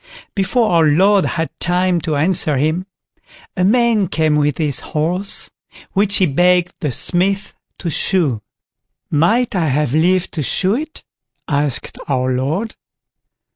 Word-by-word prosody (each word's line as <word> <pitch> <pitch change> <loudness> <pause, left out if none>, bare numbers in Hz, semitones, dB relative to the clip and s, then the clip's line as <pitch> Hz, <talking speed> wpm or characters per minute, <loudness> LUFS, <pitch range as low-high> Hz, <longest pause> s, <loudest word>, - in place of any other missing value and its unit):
Before 215 +3 +1
our 165 -2 +4
Lord 190 +6 +3
had 165 -1 -2
time 180 0 +1
to 155 -1 -2
answer 155 -1 +1
him, 160 +7 -1 0.7
a 180 - 0
man 225 -1 +3
came 155 -1 +1
with 150 -1 +1
his 150 -4 0
horse, 175 +6 -1 0.4
which 200 +1 +1
he 190 - +4
begged 175 +4 +2
the 150 -7 -2
Smith 195 - +1 0.2
to 170 - -4
shoe. 150 - +1 0.7
"Might 215 +11 +2
I 170 -4 +1
have 145 -1 0
leave 180 +4 +2
to 160 - -4
shoe 185 +7 +1
it?" 310 +6 -5 0.4
asked 145 -3 -2
our 130 -2 0
Lord. 155 - -2
175 Hz, 135 wpm, -17 LUFS, 150-195 Hz, 0.7 s, our